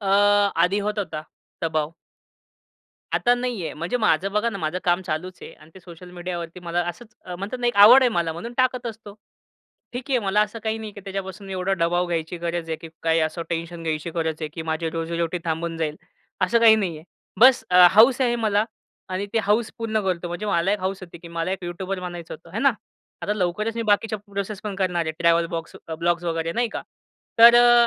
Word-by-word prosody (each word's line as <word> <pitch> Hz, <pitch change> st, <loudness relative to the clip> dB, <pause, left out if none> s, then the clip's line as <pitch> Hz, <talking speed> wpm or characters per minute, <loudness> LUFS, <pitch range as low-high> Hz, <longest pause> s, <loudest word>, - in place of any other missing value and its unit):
अ, 200 Hz, -, -5 dB, 0.5 s
आधी 180 Hz, +4 st, +3 dB
होतं 210 Hz, 0 st, 0 dB
होता, 155 Hz, -5 st, -6 dB, 0.4 s
दबाव 155 Hz, -2 st, 0 dB, 1.2 s
आता 245 Hz, 0 st, +3 dB
नाही 245 Hz, -6 st, -3 dB
आहे. -, -, -4 dB
म्हणजे 170 Hz, +10 st, -2 dB
माझं 195 Hz, -4 st, +2 dB
बघा 210 Hz, +3 st, +1 dB
ना, 200 Hz, -, -6 dB
माझं 160 Hz, +1 st, -2 dB
काम 175 Hz, +1 st, +2 dB
चालूचं 180 Hz, +1 st, -5 dB
आहे. -, -, -10 dB
आणि 155 Hz, +1 st, -19 dB
ते 190 Hz, -, -13 dB
सोशल 180 Hz, 0 st, -12 dB
मीडियावरती 175 Hz, -1 st, -6 dB
मला 175 Hz, 0 st, -1 dB
असंच 215 Hz, +5 st, -9 dB, 0.2 s
म्हणतात 200 Hz, +6 st, -5 dB
ना 245 Hz, -, 0 dB
एक 240 Hz, -, 0 dB
आवड 225 Hz, +6 st, +9 dB
आहे 255 Hz, -, +5 dB
मला 170 Hz, -2 st, 0 dB
म्हणून 200 Hz, +9 st, -7 dB
टाकत 255 Hz, -1 st, +1 dB
असतो. 220 Hz, -2 st, -8 dB, 0.8 s
ठीक 245 Hz, +1 st, -5 dB
आहे, 255 Hz, -, +3 dB
मला 205 Hz, -1 st, +1 dB
असं 215 Hz, +2 st, -4 dB
काही 220 Hz, 0 st, -1 dB
नाही 220 Hz, -1 st, -6 dB
की 205 Hz, -, -10 dB
त्याच्यापासून 195 Hz, 0 st, -6 dB
एवढा 190 Hz, +1 st, -1 dB
दबाव 175 Hz, +1 st, +1 dB
घ्यायची 170 Hz, 0 st, -3 dB
गरज 170 Hz, 0 st, -3 dB
आहे. 160 Hz, -, -2 dB
की 165 Hz, -, -9 dB
काय 165 Hz, 0 st, +2 dB
असं 160 Hz, +2 st, -5 dB
टेन्शन 170 Hz, 0 st, -4 dB
घ्यायची 160 Hz, 0 st, -2 dB
गरज 160 Hz, -2 st, -1 dB
आहे? 155 Hz, -, -3 dB
की 160 Hz, -, -5 dB
माझी 160 Hz, 0 st, -2 dB
रोजी 165 Hz, 0 st, -3 dB
रोटी 170 Hz, +1 st, -1 dB
थांबून 165 Hz, 0 st, -2 dB
जाईल, 155 Hz, -2 st, -2 dB, 0.5 s
असं 210 Hz, +6 st, +2 dB
काही 225 Hz, -1 st, +7 dB
नाही 185 Hz, -7 st, -2 dB
आहे. 155 Hz, -, -15 dB, 0.4 s
बस 255 Hz, +1 st, +7 dB
अ, 180 Hz, 0 st, +8 dB
हौस 230 Hz, +6 st, +6 dB
आहे 240 Hz, -2 st, +2 dB
मला 215 Hz, -2 st, +1 dB, 0.4 s
आणि 185 Hz, +2 st, -3 dB
ते -, -, +4 dB
हौस 215 Hz, +3 st, +1 dB
पूर्ण 220 Hz, -1 st, -1 dB
करतो. 180 Hz, -2 st, -1 dB
म्हणजे 175 Hz, +5 st, -5 dB
मला 180 Hz, +1 st, +1 dB
एक 210 Hz, -, -1 dB
हौस 190 Hz, +1 st, -2 dB
होती, 170 Hz, -1 st, -10 dB
की 170 Hz, 0 st, -12 dB
मला 170 Hz, +1 st, -3 dB
एक 190 Hz, -1 st, -5 dB
यूट्यूबर 185 Hz, +2 st, -4 dB
बनायचं 175 Hz, -2 st, -7 dB
होतं, 165 Hz, +1 st, -15 dB
हे -, -, -1 dB
ना. 275 Hz, +1 st, +4 dB, 0.5 s
आता 210 Hz, -, 0 dB
लवकरचं 210 Hz, +4 st, -1 dB
मी -, -, 0 dB
बाकीच्या 215 Hz, 0 st, +1 dB
प्रोसेस 200 Hz, 0 st, -5 dB
पण 210 Hz, -2 st, -4 dB
करणार 180 Hz, -3 st, 0 dB
आहे. 160 Hz, -, -2 dB
ट्रॅव्हल 170 Hz, 0 st, +3 dB
बॉक्स 165 Hz, 0 st, -7 dB, 0.2 s
ब्लॉग्स 170 Hz, 0 st, 0 dB
वगै, 165 Hz, -1 st, -1 dB
रे 165 Hz, +1 st, -3 dB
नाही 240 Hz, +3 st, 0 dB
का. -, -, -4 dB, 0.6 s
तर 235 Hz, +1 st, +10 dB
अ, 240 Hz, 0 st, +6 dB
185 Hz, 220 wpm, -23 LUFS, 170-215 Hz, 1.2 s, तर